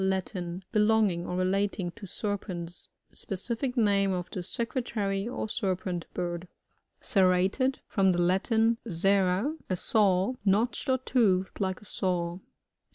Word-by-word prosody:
^Latin. 190 -1 -2
Belonging 210 -5 +2
or 180 - -3
relating 185 0 0
to 205 +1 -11
serpents. 180 -4 -5 0.3
Specific 235 +6 -3
name 200 -3 +3
of 180 -1 -4
the 185 - -3
Secretary 210 -2 -2
or 240 -2 -3
Serpent 185 -4 -2
bird. 175 0 -3 0.5
Serrated. 195 +5 +2
— - - -51
From 195 -2 +3
the 175 - 0
Latin, 220 +6 +2
serrat 195 - +2
a 185 - +1
saw. 195 +2 +2
Notched 215 +7 +1
or 260 - +4
toothed 205 -8 +1
like 190 -1 -1
a - - -14
saw. 175 -2 -1
195 Hz, 130 wpm, -29 LUFS, 180-220 Hz, 0.5 s, or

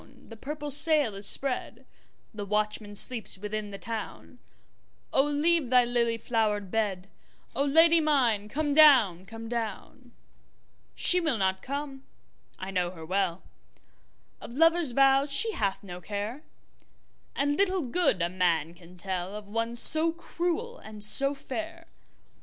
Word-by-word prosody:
the 225 - -11
purple 295 +5 -7
sail 295 -5 +3
is 200 +1 -2
spread, 270 +3 -2 0.5
The 210 -1 -7
watchman 210 0 -3
sleeps 225 -1 +2
within 210 +1 -6
the 200 - -9
town,O 230 +4 -6
leave 295 0 0
thy 250 -1 +4
lily 235 -1 -1
flowered 215 -4 -2
bed,O 205 +4 -5
Lady 325 +3 +4
mine 240 -9 0
come 295 +3 -2
down, 240 - +4
come 225 +1 -10
down! 235 +2 -7 0.8
She 360 - +5
will 310 -8 -1
not 190 -1 -1
come, 280 -1 -7 0.5
I 190 +1 -7
know 180 -2 -2
her 165 -3 -11
well, 185 0 -2 1.0
Of 235 - -10
lover's 330 -2 +2
vows 275 +2 +2
she 450 +10 +5
hath 200 - -3
no 180 -2 -10
care, 210 - -6 0.9
And 285 +1 -1
little 380 0 0
good 245 - 0
a 170 - -1
man 170 -3 -1
can 175 +1 -18
tellOf 190 +3 -6
one 230 +3 -4
so 315 +7 +7
cruel 350 +8 -5
and 215 -1 -8
so 275 +6 +3
fair. 325 +5 -8
235 Hz, 135 wpm, -26 LUFS, 200-290 Hz, 1.0 s, so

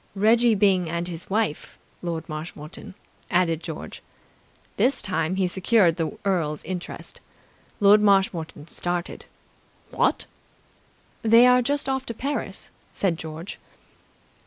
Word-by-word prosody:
"Reggie 225 +3 +4
Byng 190 -4 +3
and 170 +1 -2
his 170 -1 -7
wife, 210 -6 -1 0.2
Lord 170 -2 -4
Marshmoreton," 155 +2 -8 0.3
added 170 -3 +2
George. 160 -3 -7 0.7
This 265 +3 +2
time 180 -2 -1
he 190 -1 +1
secured 190 -1 +3
the 165 +6 -3
earl's 165 -6 0
interest. 180 -1 -7 0.6
Lord 205 0 +6
Marshmoreton 190 -7 +1
started. 175 +1 -4 0.7
"What!" - - +1 1.0
"They 230 +2 +6
are 250 0 +6
just 285 +3 -1
off 265 0 -2
to 230 - -5
Paris," 280 +5 -4 0.2
said 185 -4 0
George. 160 +3 -8
185 Hz, 115 wpm, -24 LUFS, 165-220 Hz, 1.0 s, Lord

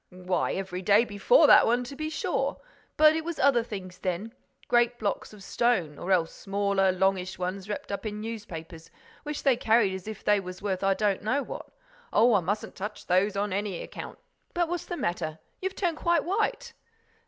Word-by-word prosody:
"Why 180 -1 -1
every 190 -1 -4
day 205 +5 +4
before 220 - +4
that - - +7
one, 240 +2 +2
to 270 +3 -8
be 310 +2 -3
sure! 310 - -1 0.4
But 310 0 +7
it 320 - -1
was 340 0 -4
other 260 -3 +4
things 190 -5 -8
then—great 230 +5 -1
blocks 205 -4 -2
of 210 -2 -13
stone—or 190 -9 0
else 170 -3 +2
smaller, 200 -1 +1
longish 190 0 0
ones, 185 +2 -4
wrapped 205 - -5
up 200 - -3
in 210 0 -5
newspapers, 170 -7 -7 0.3
which 300 -1 -5
they 270 -3 +4
carried 220 -4 +3
as 190 +1 -7
if 220 -2 -7
they 210 -1 +4
were 185 -1 -7
worth 195 -2 -2
I 195 0 +3
don't 200 -1 0
know 260 +7 0
what. - - -7 0.4
Oh, 235 +1 +5
I 205 - +5
mustn't 200 +5 -3
touch 210 +1 -6
those 190 +3 +2
on 200 -1 -1
any 200 -2 -2
account!—But 345 -1 -6
what's 350 +1 -4
the 350 - -4
matter? 160 - -2 0.2
You've 380 +1 -3
turned 345 -5 -1
quite 340 -1 +2
white." 455 +6 -1
205 Hz, 185 wpm, -27 LUFS, 190-245 Hz, 0.4 s, that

